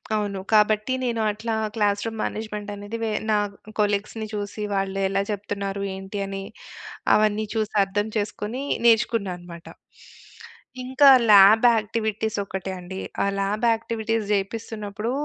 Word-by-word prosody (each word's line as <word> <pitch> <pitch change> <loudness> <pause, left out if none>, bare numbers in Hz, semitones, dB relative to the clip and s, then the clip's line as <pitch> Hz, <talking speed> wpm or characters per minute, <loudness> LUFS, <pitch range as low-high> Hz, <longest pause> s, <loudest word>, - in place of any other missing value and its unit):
అవును. 205 -2 -2
కాబట్టి 215 +2 +3
నేను 235 -2 -1
అట్లా 220 +2 -3 0.2
క్లాస్ 205 -2 +1
రూమ్ 225 -1 -4
మేనేజ్‌మెంట్ 210 -1 -4
అనేది 205 +2 -6
వె 225 - 0 0.2
నా 215 - +4 0.4
కొలీగ్స్‌ని 210 +1 0
చూసి 205 +1 -4
వాళ్ళు 195 0 -1
ఎలా 195 +1 0
చెప్తున్నారు, 200 -1 -3
ఏంటి 195 +1 -6
అని, 195 0 -5 0.7
అవన్నీ 215 0 +2
చూసి 220 -1 -1
అర్థం 205 +2 -1
చేసుకొని 210 +4 -3 0.2
నేర్చుకున్నా 225 -3 +3
అన్నమాట. 175 -1 -12 1.2
ఇంకా 265 +2 +5 0.2
ల్యాబ్ 205 +3 +8
యాక్టివిటీస్ 220 0 -2
ఒకటే 190 -1 -5
అండి. 190 +2 -7 0.2
ఆ - - +2
ల్యాబ్‌ 205 +4 0
యాక్టివిటీస్ 225 -1 -2
జేపిస్తున్నప్పుడు, 210 +2 -3
210 Hz, 125 wpm, -24 LUFS, 200-220 Hz, 1.2 s, ల్యాబ్